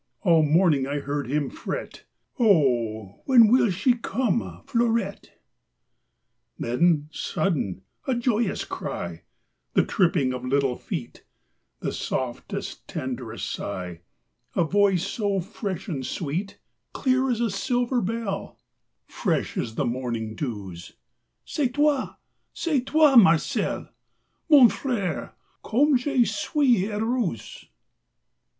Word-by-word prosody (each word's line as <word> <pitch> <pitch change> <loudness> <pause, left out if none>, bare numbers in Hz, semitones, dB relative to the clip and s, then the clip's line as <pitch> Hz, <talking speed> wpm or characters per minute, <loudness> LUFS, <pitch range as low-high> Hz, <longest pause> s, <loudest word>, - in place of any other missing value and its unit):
All 170 -5 +5
morning 155 -3 +3
I 145 +1 -2
heard 145 -2 -3
him 145 0 -1
fret: - - -6 0.3
"Oh, 120 - +2
when 240 -5 +7
will 245 -3 +5
she 200 +8 +2
come, 190 - -2
Fleurette?" 230 -4 -1 1.2
Then 150 +4 +1
sudden, 130 - -2 0.2
a 260 - +1
joyous 235 -3 0
cry; 85 -1 -5 0.5
The - - +4
tripping 165 -8 +2
of 125 -1 -5
little 135 0 +1
feet; - - -6 0.6
The - - -2
softest, 125 -2 -4
tenderest - - -5
sigh; 90 -2 -5 0.5
A - - +3
voice 195 +1 +2
so 200 -1 -1
fresh 195 0 -5
and 145 -8 -3
sweet; 170 +8 -3 0.4
Clear 260 0 +1
as 240 -3 0
a 235 -3 +1
silver 245 +4 0
bell, 205 -1 -3 0.5
Fresh - - -2
as 110 -1 -3
the - - 0
morning 120 -3 -3
dews: 100 - -6 0.5
"C'est 260 -5 -1
toi, 290 -2 +1 0.4
c'est 305 -6 0
toi, 305 -3 +5
Marcel! 165 -8 +3 0.6
Mon 285 -6 +9
fr├¬re, 205 - -3 0.3
comme 280 +6 +3
je 250 -1 +2
suis 220 +1 +1
heureuse!" 220 - -2
190 Hz, 110 wpm, -25 LUFS, -, 1.2 s, Mon